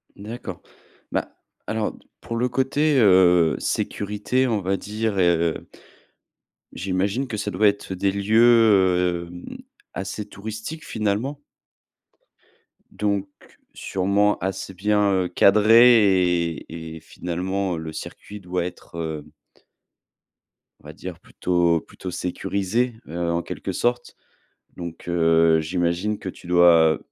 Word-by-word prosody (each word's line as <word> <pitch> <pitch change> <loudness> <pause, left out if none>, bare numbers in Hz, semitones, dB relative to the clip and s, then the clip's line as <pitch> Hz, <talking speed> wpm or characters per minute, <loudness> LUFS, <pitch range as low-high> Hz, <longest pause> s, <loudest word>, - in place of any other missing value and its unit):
D'accord. 110 +4 -8 0.5
Bah, - - -3 0.3
alors 110 -1 -2 0.3
pour 115 - -5
le 125 - +1
côté, 140 +4 +1
heu, 90 -5 +5
sécurité, 105 +6 -1
on 110 -4 0
va 95 +1 0
dire 105 -1 -3
et 90 - +4
heu 85 0 -2 1.1
j'imagine 95 +8 -1
que 110 - -4
ça 105 - -3
doit 105 +4 +3
être 100 -1 -1
des 95 +2 0
lieux, 100 +3 +2
heu, 95 -7 +4
hem, 90 0 -9 0.4
assez 95 +2 -5
touristiques, 110 +10 -7
finalement 110 +7 -2 1.5
donc 100 -2 -1 0.5
sûrement, 100 +2 +1
assez 95 0 -4
bien, 105 +2 +1
heu, 95 -2 +1
cadrés 100 -4 +5
et 80 0 -9
et - - -10
finalement, 90 +2 -3
le 80 0 -6
circuit 105 +6 -9
doit 90 -2 -3
être, 90 -1 -9
heu 80 -3 -4 1.6
on - - -13
va - - -9
dire - - -8
plutôt 85 -2 0
plutôt 90 - -9
sécurisé, 100 +6 -2
heu, 85 +1 -2
en 85 - 0
quelque - - -5
sorte. 120 0 -1 0.6
Donc 85 -1 -8
heu, 80 -1 +3
j'imagine 90 +5 -1
que - - -7
tu 90 - -10
dois 85 -3 +5
95 Hz, 120 wpm, -23 LUFS, 85-105 Hz, 1.6 s, heu